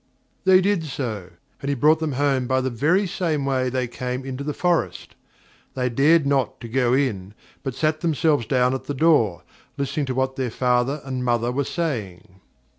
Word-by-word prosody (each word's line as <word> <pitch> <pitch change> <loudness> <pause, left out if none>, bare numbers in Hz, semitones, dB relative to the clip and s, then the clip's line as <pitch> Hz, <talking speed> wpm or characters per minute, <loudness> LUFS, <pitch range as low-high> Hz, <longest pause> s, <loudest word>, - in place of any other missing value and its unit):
They 185 0 +6
did 190 -4 +1
so, 115 - -4 0.3
and 140 - -3
he 140 - +1
brought 155 +5 +4
them 160 -3 -2
home 135 -2 +1
by 130 +1 +2
the 130 0 -1
very 160 - +2
same 160 -5 -1
way 130 -2 0
they 130 0 -1
came 125 +2 -4
into 135 +1 -5
the 150 - -2
forest. 175 +3 -1 0.6
They 125 -1 0
dared 145 +6 +4
not 140 -2 0
to 115 - -6
go 125 +1 +1
in, 105 -8 -1 0.3
but 135 -3 -4
sat 155 0 0
themselves 155 -6 +1
down 125 -1 +2
at 130 - -4
the 145 - -4
door, 130 - +3 0.3
listening 140 +1 -2
to 130 - -2
what 130 0 -1
their 130 -2 -1
father 125 +4 0
and 130 -2 -3
mother 120 -1 +1
were 140 +2 -1
saying. 105 - -4
135 Hz, 190 wpm, -23 LUFS, 125-150 Hz, 0.6 s, They